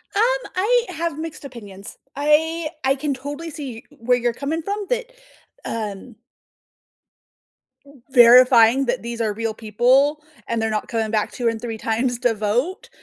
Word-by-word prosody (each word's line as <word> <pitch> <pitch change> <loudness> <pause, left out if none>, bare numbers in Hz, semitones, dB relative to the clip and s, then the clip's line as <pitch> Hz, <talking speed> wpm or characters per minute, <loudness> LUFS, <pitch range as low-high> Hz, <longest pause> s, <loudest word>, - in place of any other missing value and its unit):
Um, - - +3 0.3
I 465 +6 +2
have 335 -3 -3
mixed 320 -2 -7
opinions. 205 -7 -10 0.2
I 310 +3 +1
I 265 +1 +2
can 285 +1 -2
totally 285 +5 -7
see 275 -6 -7
e - - -19
where 245 +2 0
you're 240 -1 -1
coming 295 +6 -3
from 405 +4 -4
that, - - -2 0.5
um 215 +1 -5 1.9
verifying 245 0 +7
that 245 +1 -1
these 235 0 -6
are 220 -2 0
real 225 +1 -3
people 255 +8 +2 0.2
and 230 -1 -1
they're 225 - 0
not 215 -1 -2
coming 225 -2 -2
back 215 -1 0
2 240 -2 -1
and 225 - -4
3 225 -1 -5
times 235 +3 -1
to 245 -2 +2
vote 235 - -2
250 Hz, 155 wpm, -21 LUFS, 225-300 Hz, 1.9 s, verifying